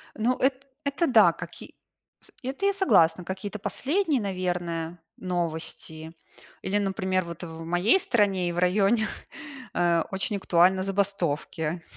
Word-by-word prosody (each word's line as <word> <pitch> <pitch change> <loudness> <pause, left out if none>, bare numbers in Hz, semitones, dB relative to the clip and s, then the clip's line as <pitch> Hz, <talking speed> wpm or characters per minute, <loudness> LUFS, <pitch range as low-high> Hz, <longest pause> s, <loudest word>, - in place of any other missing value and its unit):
Ну, 235 +4 +1
эт 265 +1 0 0.2
это 280 +4 0
да, 260 - +6
как - - -9
и - - -12 0.4
с - - -11
это 275 +10 -3
я 400 - +3
согласна. 180 - +4
Какие-то 195 +3 -5
последние, 285 - 0
наверное, 175 -3 -3 0.2
новости. 160 -2 -4 0.5
Или, 200 +2 0
например, 190 -2 0
вот 170 +1 -8
в 165 -1 -7
моей 175 - +3
стране 195 - +1
и - - -2
в 170 - -6
районе, 200 +5 +3 0.7
э, 170 -1 +2
очень 200 +2 -1
актуальны 185 +1 +3
забастовки. 175 -4 -1
190 Hz, 135 wpm, -26 LUFS, 170-215 Hz, 0.7 s, да